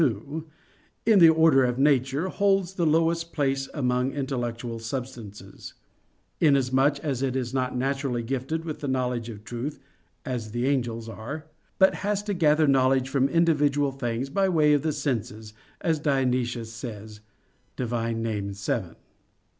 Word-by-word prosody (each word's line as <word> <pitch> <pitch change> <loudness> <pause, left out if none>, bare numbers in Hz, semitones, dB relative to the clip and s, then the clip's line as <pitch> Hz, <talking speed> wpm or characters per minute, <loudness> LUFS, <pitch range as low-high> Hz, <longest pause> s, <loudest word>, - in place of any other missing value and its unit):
2) 140 +5 -1 0.6
in 220 -3 +6
the 165 -2 +9
order 160 -4 +5
of 125 -1 0
nature, 135 +3 +2
holds 195 -2 +1
the 175 -3 0
lowest 165 +1 +1
place 135 -2 -1
among 125 -2 0
intellectual 120 -4 -3
substances; 115 -5 -7 0.6
inasmuch 140 -1 +3
as 135 -5 -2
it 130 -1 -1
is 125 -2 -2
not 130 -1 -1
naturally 135 -2 -1
gifted 135 +7 -3
with 155 -2 -5
the 145 - -4
knowledge 125 -3 -1
of 105 -2 -9
truth, 120 +6 -5 0.5
as 125 -5 -4
the 120 +1 -1
angels 120 -5 -1
are; 120 +8 -7 0.3
but 190 0 +5
has 205 +1 -1
to 210 -1 -2
gather 155 -3 +3
knowledge 130 -1 +3
from 135 0 +2
individual 145 -4 +2
things 130 0 -3
by 195 +4 +2
way 155 -4 +4
of 145 - +3
the 160 - 0
senses, 110 -7 -3 0.3
as 160 -2 +1
Dionysius 125 -5 0
says 110 -2 -8 0.6
(Div. 120 -2 -3
Nom. 115 -1 -1 0.3
vii). 100 - -3
135 Hz, 145 wpm, -26 LUFS, 120-150 Hz, 0.6 s, the